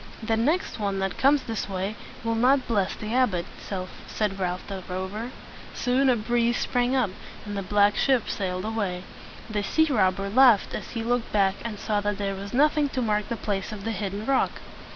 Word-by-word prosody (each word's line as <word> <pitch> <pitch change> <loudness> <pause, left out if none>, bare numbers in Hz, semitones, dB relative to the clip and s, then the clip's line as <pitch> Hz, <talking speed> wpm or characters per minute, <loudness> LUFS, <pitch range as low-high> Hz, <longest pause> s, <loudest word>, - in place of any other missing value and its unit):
"The 225 0 +1
next 290 +6 0
one 200 -2 -1
that 195 0 -2
comes 275 +1 +4
this 225 -3 -3
way 195 +2 -2 0.3
will 230 0 0
not 255 +4 +3
bless 205 -5 +1
the 215 +1 -5
abbot," 225 -9 +2 0.6
said 205 -3 -2
Ralph 180 -1 -2
the 195 -2 -5
Rover. 190 +6 -4 0.5
Soon 260 +2 +2
a 250 - +5
breeze 235 +1 +1
sprang 245 +1 +1
up, 245 -7 +2 0.3
and 205 -1 -5
the 200 - -1
black 205 +2 +3
ship 260 -5 +2
sailed 185 -1 -2
away. 200 -5 -2 0.4
The 215 -2 -1
sea 315 +10 +3
robber 195 -4 +2
laughed 235 0 +5
as - - -5
he 230 -1 -4
looked 240 0 0
back 195 -2 +3
and 225 -3 -4
saw 210 0 0
that 205 0 -1
there 200 -1 -1
was 195 +1 -7
nothing 295 +2 +3
to 260 - -2
mark 210 -2 0
the 235 - -1
place 200 0 -2
of 205 -2 -7
the 225 - 0
hidden 200 0 -3
rock. 275 +1 +2
215 Hz, 195 wpm, -26 LUFS, 195-245 Hz, 0.6 s, a